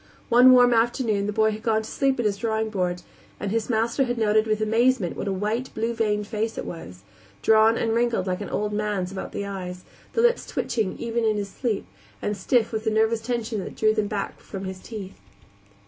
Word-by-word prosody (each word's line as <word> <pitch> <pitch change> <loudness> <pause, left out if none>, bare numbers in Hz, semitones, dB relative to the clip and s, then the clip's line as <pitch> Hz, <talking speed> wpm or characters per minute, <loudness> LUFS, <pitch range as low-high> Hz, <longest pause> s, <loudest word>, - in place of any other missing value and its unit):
One 250 +2 +8
warm 245 -1 +6
afternoon 225 -3 +1
the - - 0
boy 220 +1 +2
had 215 0 -6
gone 220 -1 +1
to - - -8
sleep 270 -2 +1
at 240 - 0
his 200 -1 +1
drawing 220 0 -1
board, 180 -3 -1 0.4
and 200 - -3
his 225 +1 -1
master 230 +4 +1
had 245 -1 -2
noted 215 0 +3
with 215 0 +1
amazement 225 -2 +2
what - - -4
a - - 0
white, 215 +6 -2
blue 230 +2 -1
veined 210 -2 0
face 220 +1 -3
it - - -4
was; 90 - -9 0.4
drawn 220 +1 +5
and 225 -1 0
wrinkled 235 -4 +1
like 185 +1 -2
an 205 - -5
old 210 0 -2
man's 205 -3 -1
about 195 - -6
the 200 - -4
eyes, 180 -2 -6 0.3
the 460 - +2
lips 480 0 +2
twitching 215 -5 -2
even 235 0 -2
in 215 -1 +2
his 200 -1 -3
sleep, 225 -4 -2 0.3
and 210 - -2
stiff 225 +4 +1
with 220 0 -3
a - - +5
nervous 220 +1 +2
tension 225 -3 -2
that - - -8
drew 215 0 +3
them 215 -1 0
back 205 -1 -4
from 195 -1 -8
his 190 0 -6
teeth. 200 -2 -8
220 Hz, 220 wpm, -25 LUFS, 205-230 Hz, 0.4 s, One